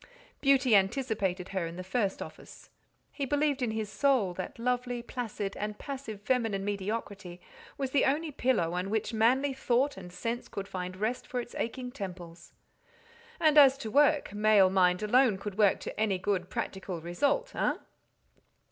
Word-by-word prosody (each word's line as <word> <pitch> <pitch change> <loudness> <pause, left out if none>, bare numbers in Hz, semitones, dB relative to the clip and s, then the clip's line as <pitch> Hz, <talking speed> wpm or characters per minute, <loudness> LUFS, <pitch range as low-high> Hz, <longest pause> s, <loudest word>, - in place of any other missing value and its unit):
Beauty 270 -4 +4
anticipated 195 -3 0
her 190 -3 -2
in 165 - -8
the 185 - -6
first 195 +1 -1
office. - - -13 0.4
He 285 - -5
believed 290 0 +1
in 245 - +1
his 220 -1 -3
soul 245 -6 +2
that 185 +1 -6
lovely, 245 0 -1
placid, 220 -5 -4
and 210 0 -4
passive 265 -7 -6
feminine 225 -5 0
mediocrity 200 -2 -4 0.4
was 270 -2 -2
the 280 - +3
only 305 +3 0
pillow 245 - +1
on 180 +2 -2
which 220 +2 -1
manly 255 +5 +3
thought 265 0 +1
and 180 -2 -9
sense 230 +7 -4
could 200 0 -6
find 185 -1 -5
rest 220 +5 -2
for 250 - -3
its 240 - -7
aching 250 +2 -4
temples; 175 -5 -8 0.9
and 310 -2 +6
as 270 -2 +7
to 225 -6 -6
work, 290 -3 +3
male 205 -2 +5
mind 180 0 +3
alone 240 -1 +4
could 200 0 -6
work 205 -3 +4
to - - -6
any 210 -3 +1
good 185 -1 -1
practical 190 -2 -4
result—hein? 285 - 0
215 Hz, 160 wpm, -30 LUFS, 190-260 Hz, 0.9 s, as